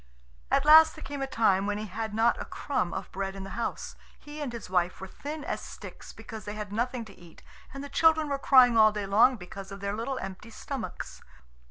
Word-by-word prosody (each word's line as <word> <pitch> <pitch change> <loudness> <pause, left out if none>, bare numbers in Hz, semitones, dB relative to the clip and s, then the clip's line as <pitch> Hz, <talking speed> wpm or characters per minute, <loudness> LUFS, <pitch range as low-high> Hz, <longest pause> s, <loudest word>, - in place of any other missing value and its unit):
At - - +2
last 315 +1 +8
there 310 - -10
came 285 -1 -6
a 270 - -1
time 200 -6 +2
when 205 0 -1
he 215 - -4
had 220 +2 -4
not 230 +2 +2
a - - -5
crumb 180 -11 -2
of - - -6
bread 195 0 -4
in 195 - -7
the 195 - -8
house. 235 - -4 0.2
He 295 +1 -10
and 280 -4 -3
his 235 -2 -7
wife 180 -1 0
were 190 - -6
thin 295 +9 -7
as - - -3
sticks - - -10
because 220 -1 -9
they 205 - -5
had 210 -1 -6
nothing 240 +1 -2
to 200 -3 -15
eat, 170 -2 -16 0.3
and 275 +1 -7
the - - -6
children 315 +1 +3
were 280 -1 -2
crying 255 -4 +6
all 215 -1 +7
day 210 -1 -4
long 220 +6 +5
because 195 0 -9
of 195 - -8
their 200 0 -3
little 255 +4 -3
empty 195 +2 -7
stomachs. 260 +2 -7
225 Hz, 230 wpm, -28 LUFS, 195-275 Hz, 0.3 s, last